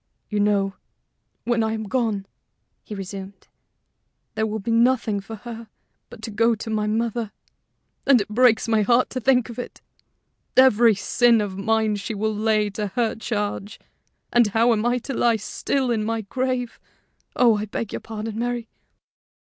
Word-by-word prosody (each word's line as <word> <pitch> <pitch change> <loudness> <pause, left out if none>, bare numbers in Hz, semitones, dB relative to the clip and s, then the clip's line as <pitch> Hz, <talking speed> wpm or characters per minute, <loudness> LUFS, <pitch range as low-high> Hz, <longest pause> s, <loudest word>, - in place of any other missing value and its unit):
"You 210 - 0
know, 200 -1 +2 0.7
when 240 -1 +1
I 220 0 0
am 220 0 -3
gone," 215 -3 -1 0.6
he 210 - -7
resumed, 195 0 -8 0.9
"there 220 - 0
will 215 0 -3
be 220 +2 -3
nothing 230 -3 +2
for 200 +3 -8
her 230 +1 -9 0.4
but 220 - -13
to 220 - -5
go 230 +2 +2
to 220 +1 -6
my 215 -1 0
mother; 225 0 -1 0.8
and 270 -3 +6
it 200 - -2
breaks 225 +1 +3
my 220 -1 +3
heart 235 +4 +3
to 255 - -3
think 250 -1 +3
of 235 0 -8
it. 245 - -7 0.8
Every 240 -4 +6
sin 235 +4 +3
of 205 -3 -3
mine 220 +1 +1
she 210 +2 -5
will 215 +2 -1
lay 215 -1 +1
to 210 +1 -3
her 235 -2 +1
charge; 210 -2 -4 0.5
and 240 -2 +5
how 225 +3 +3
am 220 +1 0
I 245 +1 +2
to 260 +3 -5
lie 235 -2 +3
still 255 +4 -1
in 220 -2 0
my 225 +1 -1
grave 250 +2 -3 0.6
oh, 235 -4 +4
I 210 - -2
beg 215 +1 -5
your - - -3
pardon, 220 0 -6
Mary." 240 -1 -2
220 Hz, 170 wpm, -23 LUFS, 210-240 Hz, 0.9 s, and